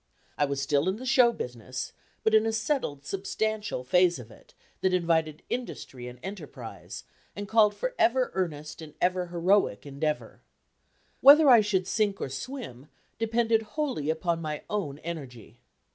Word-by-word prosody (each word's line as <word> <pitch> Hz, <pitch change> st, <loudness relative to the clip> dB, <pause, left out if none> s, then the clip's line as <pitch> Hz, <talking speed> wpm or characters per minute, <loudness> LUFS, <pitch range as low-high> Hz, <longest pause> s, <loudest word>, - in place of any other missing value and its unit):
I 145 Hz, -, +2 dB
was 140 Hz, -1 st, -2 dB
still 145 Hz, +4 st, +1 dB
in 190 Hz, -, -1 dB
the 250 Hz, +4 st, -8 dB
show 255 Hz, -2 st, +5 dB
business, 125 Hz, -, -6 dB, 0.3 s
but 220 Hz, -, +2 dB
in 220 Hz, 0 st, +5 dB
a -, -, +1 dB
settled, 220 Hz, -, -2 dB
substantial 210 Hz, -3 st, -2 dB
phase 175 Hz, +5 st, +3 dB
of 120 Hz, -3 st, -11 dB
it, -, -, -19 dB, 0.2 s
that 185 Hz, -1 st, +2 dB
invited 160 Hz, -3 st, 0 dB
industry 135 Hz, -, -5 dB
and 125 Hz, 0 st, -9 dB
enterprise, 155 Hz, -, -8 dB, 0.3 s
and 205 Hz, 0 st, -5 dB
called 210 Hz, -1 st, +4 dB
for -, -, -3 dB
ever 255 Hz, +2 st, +3 dB
earnest 155 Hz, -4 st, -3 dB
and 155 Hz, -2 st, -11 dB
ever 180 Hz, 0 st, +1 dB
heroic 175 Hz, -, +1 dB
endeavor. 150 Hz, +2 st, -3 dB, 0.8 s
Whether 285 Hz, +1 st, +8 dB
I 235 Hz, -3 st, +8 dB
should 195 Hz, -3 st, 0 dB
sink 200 Hz, 0 st, 0 dB
or -, -, -3 dB
swim 140 Hz, -, -7 dB, 0.3 s
depended 225 Hz, 0 st, +2 dB, 0.2 s
wholly 260 Hz, -, -1 dB
upon 165 Hz, +1 st, 0 dB
my 150 Hz, -2 st, -4 dB
own 185 Hz, -10 st, -2 dB
energy. 125 Hz, -9 st, -8 dB
180 Hz, 155 wpm, -28 LUFS, 145-220 Hz, 0.8 s, Whether